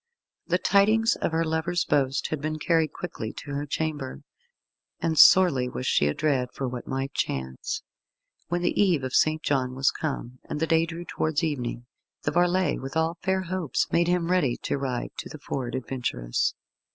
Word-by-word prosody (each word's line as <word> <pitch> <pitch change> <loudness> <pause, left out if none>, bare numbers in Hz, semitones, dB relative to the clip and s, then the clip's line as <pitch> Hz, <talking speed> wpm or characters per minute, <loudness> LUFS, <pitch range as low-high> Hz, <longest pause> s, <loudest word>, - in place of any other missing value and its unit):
The 180 - +2
tidings 215 +5 +3
of - - -1
her 165 +1 +1
lover's 160 +2 0
boast 135 -1 +1
had 155 -3 -3
been 155 +1 -2
carried 160 0 +2
quickly 110 -11 -5
to 145 - -8
her 145 +1 -3
chamber, 145 -3 -3 0.8
and 165 -1 0
sorely 155 -8 +7
was 125 - -5
she 75 - +3
adread 130 - +1
for 135 - -2
what 125 -1 -6
might 135 0 -3
chance. 65 -1 -3 0.6
When 175 +2 -1
the - - +2
Eve 175 -9 +3
of 130 0 -4
St. 155 0 +3
John 130 -3 0
was 135 +1 +3
come, 130 -5 -4
and - - -3
the 160 - +2
day 165 0 +3
drew 170 +1 -6
towards 155 -1 -1
evening, 125 -6 -2 0.4
the 145 - 0
varlet, 175 +3 +2
with 135 +4 -4
all 165 +1 0
fair 190 0 +1
hopes, 180 -6 -1
made 170 0 +3
him 175 -1 +1
ready 145 -10 +2
to 140 - -1
ride 130 -3 -3
to - - -6
the - - -8
Ford 130 -4 -4
Adventurous. 120 - -1
155 Hz, 180 wpm, -26 LUFS, 130-170 Hz, 0.8 s, sorely